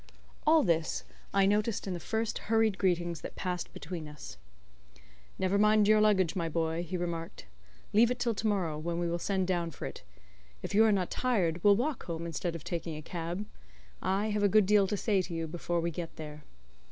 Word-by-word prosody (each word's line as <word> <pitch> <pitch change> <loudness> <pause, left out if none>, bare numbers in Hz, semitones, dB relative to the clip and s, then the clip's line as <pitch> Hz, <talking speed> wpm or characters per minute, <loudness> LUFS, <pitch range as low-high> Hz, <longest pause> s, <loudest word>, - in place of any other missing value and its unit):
All 315 0 +6
this 165 -4 0 0.3
I 195 -1 +4
noticed 210 +2 +1
in 190 - -3
the 175 - -4
first 220 +5 -2
hurried 220 -3 +3
greetings 175 -3 0
that - - -7
passed 180 -2 -3
between 165 -1 -6
us. 150 - -9 1.0
"Never 190 +2 +1
mind 210 0 +5
your 215 0 +5
luggage, 200 -4 +3
my 170 -3 -1
boy," 160 +1 -1
he 175 +1 -3
remarked. 170 - -4 0.5
"Leave 225 +3 +6
it 250 - -1
till 240 -1 0
to 220 +1 -2
morrow, 175 -7 0
when 170 +2 -3
we 175 0 0
will 170 +1 -1
send 190 +1 0
down 175 -2 0
for - - -7
it. - - -7 0.6
If - - -4
you 215 +2 +6
are 220 - +5
not 190 -3 0
tired 180 -10 0
we'll 205 -1 +7
walk 260 +5 -2
home 165 -1 -4
instead 170 +1 -3
of 165 - -7
taking 170 -2 -4
a 155 - -8
cab. 175 +5 -4 0.6
I 205 +3 0
have 210 0 0
a 205 - +4
good 215 +1 +5
deal 205 0 +4
to 205 - -1
say 200 -2 +2
to 175 -2 -6
you 165 0 -2
before 170 +1 -2
we 170 +1 -1
get 165 0 -6
there." 150 -1 -9
185 Hz, 210 wpm, -31 LUFS, 170-210 Hz, 1.0 s, we'll